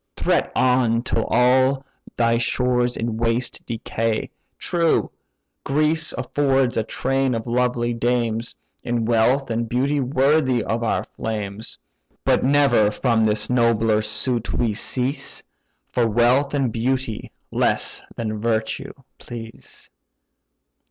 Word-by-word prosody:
Threat -, -, +1 dB
on, 125 Hz, -2 st, +2 dB
till 115 Hz, -3 st, -1 dB
all 130 Hz, +3 st, +3 dB, 0.3 s
thy 115 Hz, -1 st, +2 dB
stores 125 Hz, 0 st, 0 dB
in 115 Hz, -1 st, -2 dB
waste 115 Hz, +2 st, -1 dB
decay. 115 Hz, -1 st, -2 dB, 0.3 s
True, 170 Hz, -2 st, +1 dB, 0.5 s
Greece 155 Hz, +3 st, 0 dB
affords 135 Hz, 0 st, 0 dB
a 115 Hz, -, +2 dB
train 135 Hz, +2 st, -1 dB
of 115 Hz, -, -4 dB
lovely 120 Hz, 0 st, 0 dB
dames, 115 Hz, -1 st, -1 dB, 0.3 s
In 120 Hz, -1 st, -1 dB
wealth 120 Hz, +3 st, +2 dB
and 115 Hz, 0 st, -2 dB
beauty 140 Hz, +4 st, 0 dB
worthy 135 Hz, -1 st, +2 dB
of 115 Hz, +1 st, -2 dB
our 115 Hz, -, 0 dB
flames: 105 Hz, -1 st, -6 dB, 0.5 s
But -, -, +3 dB
never 130 Hz, -6 st, +4 dB
from 115 Hz, +1 st, +1 dB
this 105 Hz, -1 st, +2 dB
nobler 115 Hz, -3 st, +2 dB
suit 115 Hz, +2 st, +1 dB
we 115 Hz, -3 st, 0 dB
cease; 130 Hz, +6 st, -2 dB, 0.5 s
For 120 Hz, -2 st, +2 dB
wealth 125 Hz, +6 st, +2 dB
and 135 Hz, -4 st, 0 dB
beauty 125 Hz, -1 st, -2 dB, 0.2 s
less -, -, +1 dB
than 110 Hz, -2 st, -3 dB
virtue 110 Hz, -1 st, -2 dB, 0.3 s
please." 115 Hz, -1 st, -10 dB
120 Hz, 120 wpm, -22 LUFS, 115-130 Hz, 0.5 s, never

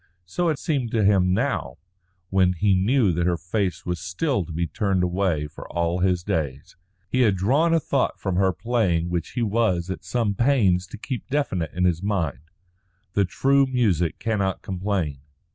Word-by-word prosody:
So 170 Hz, -, -1 dB
it 155 Hz, -, 0 dB
seemed 135 Hz, -5 st, -1 dB
to 110 Hz, -2 st, +2 dB
him 95 Hz, -2 st, +4 dB
now 100 Hz, -, -1 dB, 0.5 s
when 95 Hz, -1 st, +3 dB
he 100 Hz, +3 st, +2 dB
knew 105 Hz, +3 st, +3 dB
that 85 Hz, +1 st, 0 dB
her 90 Hz, -1 st, +1 dB
face 90 Hz, 0 st, -2 dB
was 90 Hz, -1 st, -2 dB
still 95 Hz, -, -1 dB
to 85 Hz, -, -9 dB
be 85 Hz, +2 st, -1 dB
turned 95 Hz, +2 st, 0 dB
away 90 Hz, -4 st, 0 dB
for 75 Hz, -, -10 dB
all 85 Hz, +1 st, 0 dB
his 90 Hz, -1 st, +1 dB
days. 70 Hz, -6 st, -3 dB, 0.3 s
He 130 Hz, +6 st, +1 dB
had 105 Hz, -5 st, +4 dB
drawn 135 Hz, -, +2 dB
a 165 Hz, -, +4 dB
thought 140 Hz, -3 st, -1 dB
from 95 Hz, -3 st, -2 dB
her 95 Hz, 0 st, +3 dB
playing 90 Hz, -5 st, 0 dB
which 85 Hz, -2 st, -3 dB
he 120 Hz, -, -1 dB
was 100 Hz, -5 st, 0 dB
at -, -, -6 dB
some 115 Hz, -4 st, 0 dB
pains 100 Hz, -7 st, +2 dB
to -, -, -9 dB
keep 125 Hz, +3 st, -5 dB
definite 115 Hz, -, -1 dB
in 90 Hz, -, 0 dB
his 90 Hz, -2 st, +2 dB
mind. 80 Hz, -8 st, -2 dB, 0.6 s
The 100 Hz, -, +3 dB
true 135 Hz, +9 st, +2 dB
music 95 Hz, -11 st, +1 dB
cannot 100 Hz, -5 st, -1 dB
complain. 95 Hz, -7 st, -2 dB
95 Hz, 180 wpm, -24 LUFS, 85-115 Hz, 0.6 s, him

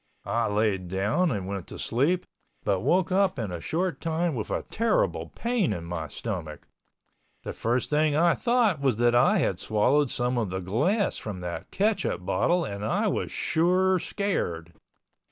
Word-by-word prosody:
I 115 Hz, 0 st, 0 dB
layed 105 Hz, -3 st, 0 dB
down 105 Hz, -, +1 dB
and 100 Hz, -8 st, -2 dB
went 95 Hz, -2 st, -5 dB
to -, -, -8 dB
sleep 155 Hz, +10 st, 0 dB, 0.4 s
but 95 Hz, -, +1 dB
woke 185 Hz, -, +1 dB
up 190 Hz, 0 st, +2 dB
in 110 Hz, -6 st, -3 dB
a 85 Hz, -2 st, -5 dB
short 170 Hz, -, -2 dB
time 165 Hz, +1 st, 0 dB
with 110 Hz, -5 st, -4 dB
a -, -, -2 dB
terrible 230 Hz, -, 0 dB
pain 235 Hz, -6 st, 0 dB
in 85 Hz, -, -5 dB
my 85 Hz, -2 st, -4 dB
stomach, 85 Hz, -3 st, -6 dB, 0.8 s
the -, -, -5 dB
first 120 Hz, +5 st, -1 dB
thing 150 Hz, 0 st, +2 dB
I 170 Hz, +2 st, +4 dB
thought 235 Hz, -, +2 dB
was 135 Hz, -6 st, +2 dB
that 120 Hz, 0 st, +3 dB
I 120 Hz, -, +4 dB
had -, -, 0 dB
swallowed 125 Hz, +7 st, +2 dB
some 125 Hz, +1 st, 0 dB
of 110 Hz, -5 st, -1 dB
the 95 Hz, +1 st, -3 dB
glass 150 Hz, -, 0 dB
from 100 Hz, -4 st, -6 dB
that 90 Hz, -1 st, -5 dB
ketchup 210 Hz, +2 st, 0 dB
bottle 175 Hz, -1 st, +1 dB
and 100 Hz, -2 st, -5 dB
I 110 Hz, -, 0 dB
was -, -, -2 dB
sure 185 Hz, +3 st, +2 dB
scared. 85 Hz, -, -2 dB
125 Hz, 170 wpm, -27 LUFS, -, 0.8 s, I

